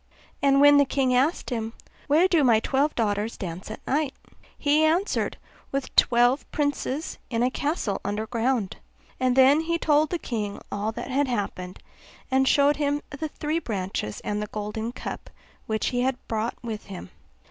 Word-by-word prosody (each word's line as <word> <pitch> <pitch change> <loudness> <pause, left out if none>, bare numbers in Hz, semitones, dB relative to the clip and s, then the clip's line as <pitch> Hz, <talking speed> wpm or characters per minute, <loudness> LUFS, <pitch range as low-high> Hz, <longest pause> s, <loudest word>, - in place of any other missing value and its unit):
And 275 -1 +4
when 290 0 +7
the 285 - +7
king 265 -1 +1
asked 275 +4 +1
him. 225 -2 -3 0.3
'Where 315 +6 +5
do 335 -5 +3
my 230 -4 +5
twelve 280 +6 0
daughters 210 0 -1
dance 180 +1 -6
at 220 - -9
night?' 285 0 0 0.4
he 300 +1 +3
answered, 340 +6 +1 0.3
'With 275 -1 -3
twelve 245 +3 +4
princes 285 0 -2
in 230 -1 0
a 250 - +2
castle 285 - -2
under 205 +2 -2
ground.' 235 -3 -1 0.4
And 255 -1 +2
then 265 +3 +6
he 335 +1 0
told 305 -2 +3
the 350 - -1
king 215 -9 -4
all 205 +2 -1
that 255 - -6
had 280 +2 +2
happened, 195 -6 -3 0.5
and 265 0 +3
showed 285 +1 +4
him 290 0 0
the 300 +2 -4
three 305 +2 -2
branches 190 - -4
and 210 0 -2
the 210 - -3
golden 215 +2 -4
cup - - -7 0.4
which 220 0 0
he 245 -1 -1
had 260 0 +1
brought 225 +1 -2
with 220 -3 -5
him. 185 - -9
255 Hz, 170 wpm, -25 LUFS, 220-290 Hz, 0.5 s, when